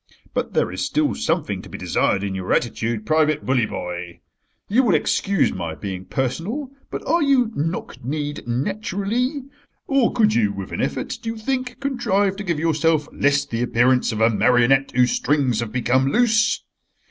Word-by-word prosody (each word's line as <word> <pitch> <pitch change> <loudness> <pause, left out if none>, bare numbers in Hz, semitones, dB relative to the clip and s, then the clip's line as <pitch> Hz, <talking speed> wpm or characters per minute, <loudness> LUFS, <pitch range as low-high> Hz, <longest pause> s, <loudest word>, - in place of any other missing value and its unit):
But - - -2
there - - +2
is - - -3
still 295 +1 +1
something 145 - -1
to - - -12
be - - -7
desired 100 - 0
in 100 -1 -2
your 95 -1 -4
attitude, 115 -2 -1
Private 155 +1 +2
Bully 125 -4 +2
boy. 85 -2 -6 0.5
You 230 +6 +3
will 240 - +3
excuse 195 -4 +1
my 85 -4 -4
being 95 -1 -6
personal, 170 - -3 0.2
but - - -6
are 335 +4 +2
you 265 -6 +3
knock 165 -2 -3
kneed 145 +1 -4
naturally? 215 - -1 0.4
Or 275 -4 +2
could 220 -3 +3
you, 105 -3 +2
with 95 -2 -7
an - - -3
effort, - - -3
do 225 - -4
you 225 - -4
think, 255 +2 -3
contrive 205 -8 0
to 205 - -5
give 170 -5 -1
yourself 160 -1 +1
less 140 0 +2
the 115 -4 -3
appearance 125 +1 +2
of 110 0 -3
a 115 +1 +5
marionette 125 +4 +3
whose 125 -1 +4
strings 135 -4 +1
have 115 -2 -3
become 130 +2 +1
loose? 225 0 +3
145 Hz, 175 wpm, -22 LUFS, -, 0.5 s, a